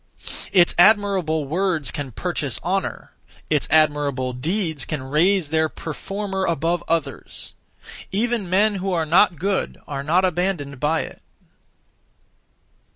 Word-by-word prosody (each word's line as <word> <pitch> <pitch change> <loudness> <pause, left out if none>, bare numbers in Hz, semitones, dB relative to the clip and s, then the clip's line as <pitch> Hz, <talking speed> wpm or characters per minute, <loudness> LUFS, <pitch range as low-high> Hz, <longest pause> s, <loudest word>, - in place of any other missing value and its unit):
(Its) 175 -3 +5
admirable 185 -6 +4
words 170 0 0
can 145 -4 -5
purchase - - -2
honour; - - -2 0.4
(its) 150 -2 +2
admirable 145 -4 +2
deeds 160 - -1
can 140 +2 -4
raise 160 +5 +2
their 160 0 +1
performer 195 +5 -4
above 170 +1 0
others. 160 -5 -3 0.6
Even 220 -1 -1
men 205 +4 +3
who 195 0 -1
are 165 -2 +1
not 175 +2 +4
good 190 +5 -1
are 140 -2 -4
not 170 +6 +2
abandoned 175 -6 -1
by 155 +4 +1
it. - - -9
165 Hz, 120 wpm, -22 LUFS, 150-190 Hz, 0.6 s, Its